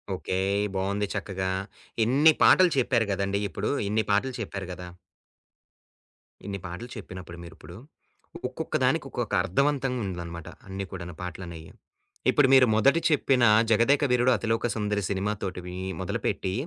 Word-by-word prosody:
Okay. 95 0 -3 0.4
బాగుంది 100 +2 -1
చక్కగా. 95 -2 -3 0.6
ఇన్ని 145 +6 +5
పాటలు 185 -2 +6
చెప్పారు 120 -3 +2
కదండీ! 100 0 -1
ఇప్పుడు 100 +6 -3 0.2
ఇన్ని 110 +1 +1
పాటలు 125 +6 +1
చెప్పారు 95 -1 -5
కదా! 90 0 -9 1.6
ఇన్ని 100 -1 -4
పాటలు 95 +7 -7
చెప్పినప్పుడు 90 -4 -9
మీరిప్పుడు, 85 0 -12 0.7
ఒక్కొక్క - - -5
దానికి - - +1
ఒక్కొక్క - - -4
అర్థవంతంగా 135 +3 0
ఉందనమాట. 85 -2 -6 0.2
అన్ని 95 0 -5
కూడా 90 -2 -6 0.2
పాటలనేయి. 85 -3 -8 0.6
ఇప్పుడు 145 -3 +4
మీరు 130 -2 +7
మొదటి 140 +9 +4
చెప్పిన 135 -4 +2 0.3
'జగదేక 115 +6 +3
వీరుడు 125 +1 +4
అతిలోక 115 +2 0
సుందరి' 105 -2 -1
సినిమాతోటివి 95 -2 -3 0.2
మొదలుపెట్టి 95 0 -2
100 Hz, 120 wpm, -26 LUFS, 95-125 Hz, 1.6 s, మీరు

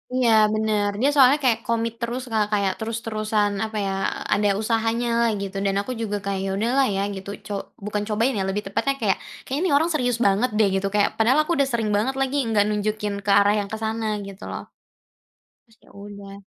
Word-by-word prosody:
Iya 250 -2 +3 0.2
bener. 215 -1 +1
Dia 280 - +4
soalnya 275 +1 +6
kayak 230 -3 +3
komit 230 0 0
terus 240 +2 -3
Kak, 215 -1 +2
kayak 200 -2 +1
terus-terusan 215 -2 -1
apa, 220 -1 -5
ya, 195 - -1 0.4
ada 205 0 +2
usahanyalah 230 +1 +1
gitu, 195 0 -5
dan 195 - +1
aku 255 - -6
juga 205 -2 -2
kayak 195 0 -2
udahlah, 250 +6 +2
ya, 195 - 0
gitu 190 +1 -8 0.2
co 205 - -4 0.3
bukan 210 0 -2
cobain, 225 +5 +1
ya, 190 - 0
lebih 205 +2 -2
tepatnya 275 +7 0
kayak, 200 -3 +2 0.3
kayaknya 290 +3 0
orang 320 +4 +2
serius 245 -6 0
banget, 205 +6 +3
deh, 215 -2 +4
gitu 195 +1 0
kayak, 205 - +3
padahal 250 +6 +4
aku 340 - -4
udah 275 - +3
sering 225 -2 0
banget 255 +6 0
lagi 270 +2 0
nggak 215 -2 +3
nunjukin 210 0 -1
ke 200 - +2
arah 205 +1 +4
yang 200 - -3
ke 220 - -2
sana 220 +1 -2 0.2
gitu, 195 -1 -11
loh. - - -5 1.0
Terus, 225 0 -25
ya, - - -21
udah. 200 0 -10
220 Hz, 195 wpm, -23 LUFS, 205-240 Hz, 1.0 s, soalnya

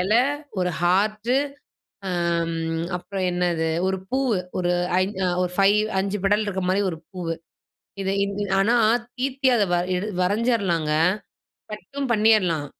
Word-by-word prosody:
இலை, 215 +6 +3 0.4
ஒரு 180 -1 +1
ஹார்டு, 215 +6 +2 0.8
ஆம். 170 -2 0 0.4
அப்பறம் 190 +1 -4
என்னது, 175 -2 0 0.2
ஒரு 190 0 0
பூவு. 260 -5 +1 0.2
ஒரு 180 -1 +1 0.3
ஐ - - +3 0.2
அ - - +2
ஒரு 180 -1 -1
5 205 +2 +4
5 200 +1 -1
பெடல் 205 +2 +3
இருக்கிற 190 -2 -2
மாரி 190 +2 +2
ஒரு 165 - -6 0.2
பூவு. 175 -3 -3 0.7
இதை 190 0 -1
இந் 200 0 -2 0.3
ஆனா, 220 +5 +3 0.4
தீத்தி 265 +1 0
அதை 210 -3 +3
வரை 175 +1 +1
எடு 195 +4 -3
வரைஞ்சிறலாங்க. 195 -5 +1 0.8
கட்டும் 275 +5 -5
பண்ணிறலாம். 210 -9 +3
195 Hz, 135 wpm, -23 LUFS, 180-215 Hz, 0.8 s, 5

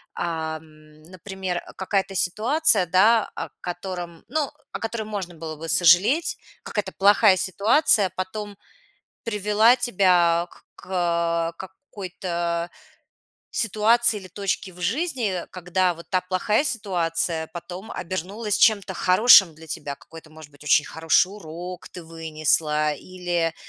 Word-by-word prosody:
ам, 160 -2 -6
например, 185 +1 -6
э, - - -9
какая-то 195 0 -1
ситуация 215 - +2
да, 210 +6 +4
о - - -5
котором 175 -2 -6
ну 295 +1 -1 0.2
о - - -5
которой 225 0 -4
можно 200 -5 -6
было 160 -1 -7
бы 165 +2 -7
сожалеть. 185 - +4 0.3
Какая-то 205 -3 -3
плохая 200 0 +5
ситуация 205 - +3
потом 205 +2 -5 0.7
привела 210 +1 +3
тебя 180 -8 +2
к - - -19 0.2
к, - - -15
э, 170 -2 0
какой-то 180 -5 -5 0.8
ситуации 225 0 +2
или 185 -1 -12
точке 195 -1 -4
в 180 - -14
жизни, 230 - -1
когда 180 0 0
вот 170 +1 -13
та 185 - +2
плохая 185 +7 0
ситуация 170 - -1
потом 180 +4 -8
обернулась 195 +5 -3
чем-то 200 -4 +3
хорошим 185 -1 +6
для 160 +1 -14
тебя. 145 -2 -5
Какой-то, 160 +2 -15
может 155 -1 -14
быть, 145 0 -18
очень 150 +1 +4
хороший 165 +3 +2
урок 180 -2 -9
ты 180 - -10
вынесла, 155 -2 0
или, 175 0 -3
185 Hz, 125 wpm, -23 LUFS, 165-210 Hz, 0.8 s, хорошим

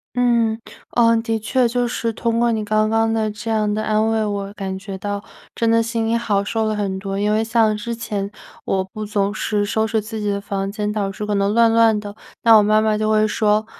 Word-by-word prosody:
嗯， 235 -3 +2 0.4
哦， 230 -1 +5
的 225 -1 -1
确， 240 +3 +1
就 245 +1 0
是 230 -1 -2
通 230 +1 0
过 235 0 +3
你 220 -2 -1
刚 215 +1 +1
刚 225 0 +1
的 220 -1 0
这 215 +2 -6
样 215 -1 +1
的 215 +1 -1
安 215 +1 +1
慰， 225 -1 +1
我 200 -1 -3
感 190 -2 -4
觉 195 0 -7
到 205 +1 -4 0.3
真 230 -1 +1
的 230 0 +4
心 230 0 -2
里 230 - +2
好 210 -4 0
受 220 +2 -1
了 215 0 0
很 195 -2 -2
多。 195 0 -4
因 210 +1 +1
为 215 +1 +1
像 225 -1 +2
之 235 +3 -4
前 205 -3 -4 0.3
我 190 - 0
不 210 +3 -7
总 205 -1 -1
是 205 -1 -1
收 220 +1 0
拾 220 0 0
自 220 +1 -7
己 210 -1 -1
的 200 - -1
房 195 -1 -3
间， 210 -1 -2
导 205 -2 -2
致 210 - -5
可 210 - -1
能 200 0 +1
乱 230 0 +4
乱 225 -2 +4
的。 205 0 -9 0.3
那 230 -1 +7
我 210 - +6
妈 215 +1 +3
妈 215 -1 +1
就 215 0 0
会 215 0 +3
说， 215 0 +1
215 Hz, 260 characters per minute, -20 LUFS, 205-225 Hz, 0.4 s, 那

